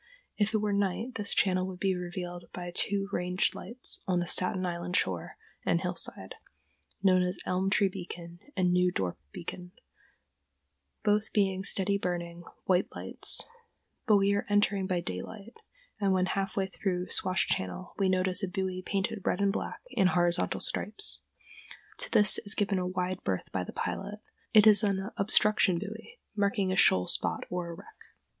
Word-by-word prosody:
If 215 +1 +1
it - - +5
were 210 -1 0
night 200 +5 -1
this 210 -4 -2
channel 185 -1 +2
would 185 -1 -7
be 190 -1 +1
revealed 175 -1 -6
by 175 -1 -6
two 200 +2 -1
range 180 0 0
lights 245 +2 0
on 185 -1 +2
the 175 - 0
Staten 185 +2 +1
Island 175 0 -3
shore - - -1 0.3
and - - +2
hillside, - - -3 0.7
known 185 -2 +5
as 180 +1 -1
Elm 185 +1 0
Tree 200 0 +3
Beacon 175 -2 -8 0.2
and 180 -1 +2
New 180 0 +3
Dorp 95 - -2
Beacon, 180 +1 -8 1.3
both 210 +1 +1
being 190 -2 +1
steady 200 0 +1
burning, 175 -2 -4 0.2
white 185 -1 +2
lights; - - +5 0.6
but 210 -2 +6
we 200 0 +3
are 200 +3 -1
entering 205 -2 +2
by 180 -2 0
daylight, 195 - -6 0.4
and 200 -2 +2
when 185 -1 +2
half 195 +2 -2
way 195 - +2
through 185 -1 -3
Swash 185 0 0
Channel 90 -1 -3
we 195 -1 +3
notice 185 +1 +1
a 195 - -1
buoy 185 0 -3
painted 200 +2 -2
red - - 0
and 200 -1 +2
black - - -4
in 190 - +3
horizontal 175 -1 +1
stripes. 410 - -2 0.8
To - - -1
this 210 -1 +4
is 205 -3 +2
given 200 -2 +1
a 180 - -1
wide 185 0 -3
berth 95 -1 -2
by 95 - -1
the - - -7
pilot. 205 +2 -4 0.3
It 215 -1 +7
is 215 -1 +8
an 200 0 -1
"obstruction" 200 -2 +4
buoy 215 - -8 0.2
marking 200 -2 +1
a - - 0
shoal 90 - +4
spot - - -1
or 180 -1 -2
a - - -5
wreck. 435 - -15
190 Hz, 170 wpm, -30 LUFS, 180-205 Hz, 1.3 s, is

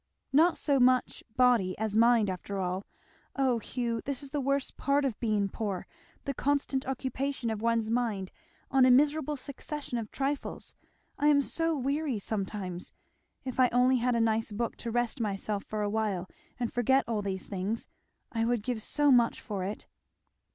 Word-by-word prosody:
"Not 325 +5 +5
so 280 -3 +2
much 255 0 +3
body 240 -8 +4
as 215 -1 -2
mind, 230 -1 +5
after 190 +2 -4
all. 185 +1 -2 0.5
Oh 260 -4 +2
Hugh! 235 0 -2
this 280 -1 -4
is 275 - -8
the 290 -1 -1
worst 275 0 -1
part 280 0 +1
of 250 -6 -2
being 215 -4 +1
poor! 195 -2 -3 0.4
the 275 - -2
constant 275 -1 0
occupation 265 -1 -2
of 215 -1 -4
one's 230 -1 +1
mind 220 -6 -1 0.4
on 270 -1 +5
a 255 - +7
miserable 295 +3 +3
succession 280 -1 -5
of 215 -2 -6
trifles. 275 +1 -3 0.5
I 295 - +3
am 285 -1 +5
so 330 +2 0
weary 280 -1 -1
sometimes! 195 -3 -4 0.5
If 255 0 -4
I 255 -1 +6
only 250 +1 +4
had 245 0 +1
a - - +2
nice 225 0 +1
book 230 +3 -2
to 235 - -5
rest 240 +3 -1
myself 205 -1 -2
for 215 -1 -3
a 205 - 0
while 205 -4 -1 0.3
and 240 -2 -2
forget 265 +3 +3
all 225 -3 -1
these 190 -2 -3
things 200 +3 -3 0.4
I 225 -3 0
would 235 -2 +1
give 240 -2 -2
so 290 +5 +2
much 240 -2 +4
for 200 -4 -4
it! 200 +3 -5
240 Hz, 175 wpm, -30 LUFS, 215-270 Hz, 0.5 s, a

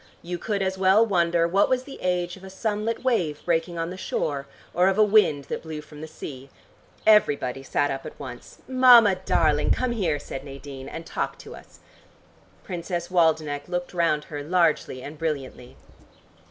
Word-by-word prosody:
You 175 +1 -5
could 205 -1 -1
as 190 0 -2
well 195 +4 +5
wonder 170 -4 +2
what 195 +4 +2
was 255 0 +1
the 275 - -11
age 180 -1 -1
of 190 - -16
a 190 - -9
sunlit 215 +4 -2
wave 175 - 0
breaking 170 0 0
on 165 +1 -2
the 185 - -7
shore, 140 -6 -3 0.3
or 180 +2 +3
of 195 0 +2
a 215 - +6
wind 205 -9 +4
that - - -5
blew 160 -2 -6
from 150 0 -13
the 160 - -6
sea. 140 -3 -9 0.6
Everybody 140 -12 +3
sat 145 +1 0
up 135 0 -4
at - - -10
once. 125 -2 -10
"Mama 250 -5 +7
darling, 160 -5 +1
come 255 -1 +1
here," 180 -10 0
said 135 -2 -7
Nadine, 135 -1 -9
"and 165 - -7
talk - - -3
to - - -11
us." - - -16 0.8
Princess 175 -1 -4
Waldenech 155 -4 +1
looked 175 0 -4
round 165 -4 +1
her 145 -2 -7
largely 155 -5 +1
and 150 +1 -9
brilliantly. 135 -5 -4
170 Hz, 180 wpm, -25 LUFS, 145-190 Hz, 0.8 s, Mama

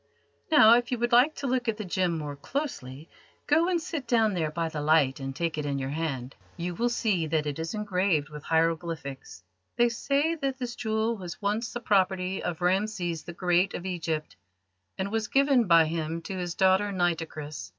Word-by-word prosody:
Now, 230 -7 +8
if 240 +1 +2
you 250 - 0
would 240 +1 -1
like 250 +6 +5
to 280 - -6
look 250 -1 0
at 220 -2 0
the 215 - -5
gem 180 -2 0
more 150 -2 -5
closely, 150 - -5 0.4
go 325 +4 +3
and 355 -2 +1
sit 310 -5 -5
down 225 -3 +3
there 165 -4 -1
by 165 +2 -2
the 155 -2 -4
light 145 -3 +3
and 135 0 -5
take 165 -1 -2
it 150 - -3
in 140 -1 -1
your 135 0 -3
hand. 140 -5 -3 0.2
You 175 +1 -3
will 235 +7 0
see 205 -9 0
that 155 -1 0
it 145 0 -3
is 165 +5 -3
engraved 185 -7 0
with 150 -1 -9
hieroglyphics. 160 - -2 0.3
They 240 0 +4
say 280 +7 0
that 275 -5 -3
this 245 -2 -5
jewel 220 0 -1
was 180 -3 -7
once 210 +3 -1
the 240 - -5
property 190 -3 +1
of 175 -2 -4
Rameses 180 -3 0
the 170 - -7
Great 180 +1 +1
of 175 - -6
Egypt, 165 -4 -3 0.6
and 195 +1 -3
was 220 -1 -1
given 270 -4 +3
by 165 -2 +6
him 165 +1 -3
to 195 - -5
his 175 -2 -4
daughter 190 +1 +3
Nitocris." 165 -5 -2
180 Hz, 200 wpm, -27 LUFS, 160-230 Hz, 0.6 s, Now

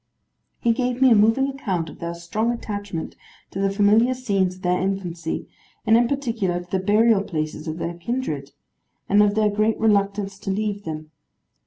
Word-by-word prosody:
He 235 - +2
gave 250 +1 -1
me 260 -1 +6
a - - +7
moving 225 +6 +4
account 200 - -2
of - - -11
their 170 0 -4
strong 210 +7 -1
attachment 205 -7 -5 0.4
to 195 - -5
the 195 0 +2
familiar 210 +5 +3
scenes 195 -7 0
of 185 - -17
their 180 0 +1
infancy, 180 -4 -3 0.4
and 220 0 +5
in 235 +1 +4
particular 230 -10 -1
to 175 0 -13
the 190 - +1
burial 210 +2 +4
places 155 -3 -4
of 155 0 -3
their 170 0 -3
kindred; 170 - -4 0.6
and 205 +1 +5
of 205 0 +3
their 215 -1 +3
great 215 +2 +1
reluctance 200 -2 +1
to 195 - -6
leave 205 +1 -2
them. 155 -1 -6
205 Hz, 180 wpm, -23 LUFS, 180-225 Hz, 0.6 s, a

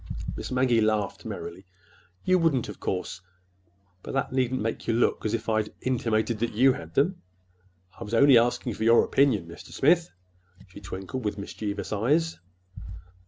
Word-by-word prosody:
Miss - - -6
Maggie 125 -3 +2
laughed 105 -2 0
merrily. 95 +2 -7 0.6
"You 185 0 +4
wouldn't, 155 -8 +1
of - - -9
course—but 90 0 -8
that 135 - -1
needn't 130 -1 0
make 115 - -3
you 115 - +1
look 120 - +1
as 110 - 0
if 115 - -6
I'd 110 -1 0
intimated 115 -3 0
that 120 0 -1
you 130 +4 +5
had 80 -6 -10
them! 175 +7 +1 0.8
I - - -5
was 110 +3 -3
only 140 +2 +7
asking 120 0 0
for 110 - -4
your 115 +1 +6
opinion, 130 -11 +2
Mr. 85 0 -12
Smith," 170 +4 +3 0.6
she - - -12
twinkled, 95 +6 -6
with 105 -1 -2
mischievous 100 +1 -5
eyes. 150 +10 +1
110 Hz, 160 wpm, -26 LUFS, 95-130 Hz, 0.8 s, only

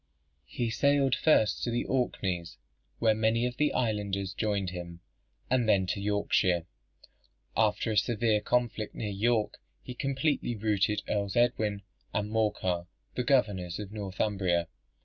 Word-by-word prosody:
He 120 -2 -2
sailed 140 +1 +3
first 130 -9 +3
to - - -1
the 120 0 -1
Orkneys, 95 -9 -1 0.4
where 110 -1 +3
many 110 +2 +1
of 125 0 -3
the 150 +1 +2
islanders 100 -5 -1
joined 100 -4 -1
him, 85 -1 -7 0.5
and 125 -3 +2
then 95 -3 +4
to 95 +2 -2
Yorkshire. 100 -4 +1 0.9
After 110 0 +2
a 105 - 0
severe 110 -2 +2
conflict 120 -3 -1
near 105 -2 -3
York, 110 +2 0 0.2
he 125 - -7
completely 135 -1 -1
routed 105 -1 +1
Earls 100 -2 -1
Edwin 110 -4 +1 0.3
and 105 0 -1
Morcar, 95 -5 0 0.3
the 125 - -1
governors 105 -10 +1
of 105 -2 -7
Northumbria. 95 -4 -1
105 Hz, 135 wpm, -29 LUFS, 100-120 Hz, 0.9 s, then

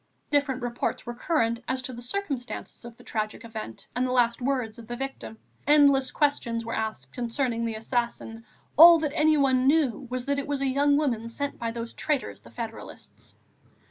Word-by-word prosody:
Different 280 -3 +1
reports 240 0 -2
were 240 - -5
current, 235 -3 0
as 260 0 -2
to 255 - -5
the 240 - -8
circumstances 255 -5 -5
of 235 -1 -10
the - - -16
tragic 215 +1 -3
event 220 - -8
and 250 - +1
the - - -2
last 240 -1 +2
words 245 -4 -1
of 225 - -11
the 240 - -4
victim; 270 -3 -6 0.3
endless 280 -3 +5
questions 235 -6 0
were 230 - -4
asked 215 -12 -4
concerning 235 -1 -1
the 225 -1 -2
assassin, 230 0 -3 0.3
all 335 +2 +11
that 305 -3 -2
anyone 280 -5 +3
knew 275 -4 +2
was 250 0 -3
that 280 0 0
it 280 - -5
was 285 -1 -1
a - - +1
young 285 +2 +3
woman 235 -7 -1
sent 285 +4 -4
by 230 - -2
those 230 0 -5
traitors, 295 -4 -2
the - - -15
federalists. 225 -2 -9
250 Hz, 185 wpm, -27 LUFS, 230-280 Hz, 0.3 s, all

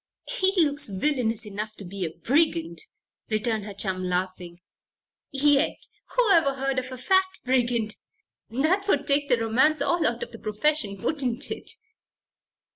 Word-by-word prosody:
"He 375 0 +2
looks 295 -7 +4
villainous 230 +1 0
enough 210 +1 -5
to 200 - -5
be 190 +1 -5
a 165 - -1
brigand," 170 - 0 0.5
returned 220 -1 0
her 205 - -6
chum, 190 -2 -2
laughing. 180 -1 -3 0.7
"Yet, 280 0 +2 0.4
whoever 345 - +4
heard 270 -1 0
of 255 0 -7
a 255 - -6
fat 375 +9 +3 0.2
brigand? 240 -4 +1 0.5
That 315 - +1
would 290 -7 +2
take 280 0 +2
the 245 - +4
romance 255 +7 +2
all 300 +4 +1
out 235 0 -1
of - - -8
the 230 - -9
profession; 215 -1 0
wouldn't 255 +2 -1
it?" - - -5
250 Hz, 145 wpm, -26 LUFS, 210-290 Hz, 0.7 s, looks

